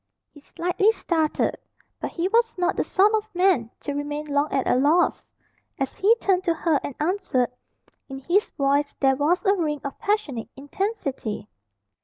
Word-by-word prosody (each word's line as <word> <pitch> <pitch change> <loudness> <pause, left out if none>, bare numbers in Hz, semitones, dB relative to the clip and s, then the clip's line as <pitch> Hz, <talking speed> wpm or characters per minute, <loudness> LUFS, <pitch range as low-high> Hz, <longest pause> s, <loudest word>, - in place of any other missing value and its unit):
He 295 - -14
slightly 360 +7 +1
started. 320 -7 0 0.4
But - - -3
he 345 +1 -2
was 460 +3 +2
not 360 0 +1
the - - 0
sort 410 +3 +3
of 430 -2 -2
man 360 - +3
to 285 - -4
remain 290 +1 -4
long 290 0 0
at 270 - 0
a - - +3
loss. 295 +7 +2 0.5
As 270 -2 -2
he 425 +4 +4
turned 380 -5 +1
to 335 -2 +2
her 315 -3 +1
and 280 - -5
answered, 300 -7 0 0.6
in 270 - -6
his 360 +9 +2
voice 285 +1 +1
there 270 -1 +3
was 320 - +1
a 395 - +5
ring 310 -6 -1
of 280 - -6
passionate 395 - -1
intensity. 275 - -4
315 Hz, 170 wpm, -24 LUFS, 280-385 Hz, 0.6 s, a